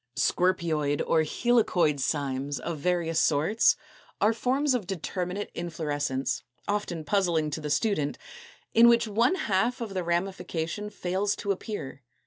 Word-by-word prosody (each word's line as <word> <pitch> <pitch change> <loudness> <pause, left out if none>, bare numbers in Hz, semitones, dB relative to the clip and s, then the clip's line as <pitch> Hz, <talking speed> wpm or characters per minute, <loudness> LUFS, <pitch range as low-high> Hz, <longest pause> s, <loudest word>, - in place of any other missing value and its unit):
225. - - -19
=Scorpioid= 165 -6 +1
or 160 - +3
=Helicoid 175 -4 +2
Cymes=, 140 0 -1
of 165 -3 -4
various 170 0 +1
sorts, 160 +10 +3 0.4
are 215 +2 +4
forms 260 +5 +1
of 225 -8 -2
determinate 180 +2 -3
inflorescence 150 -5 -2 0.3
(often 205 -6 -2
puzzling 170 -4 +1
to 155 - -4
the 150 - -4
student) 150 -2 0 0.6
in 230 +1 +7
which 235 -1 +4
one 230 - +2
half 230 - 0
of 225 -4 -5
the 185 -1 -1
ramification 175 +2 -2
fails 200 +1 -1
to 200 - -2
appear. 190 - -5
180 Hz, 135 wpm, -27 LUFS, 155-210 Hz, 0.6 s, in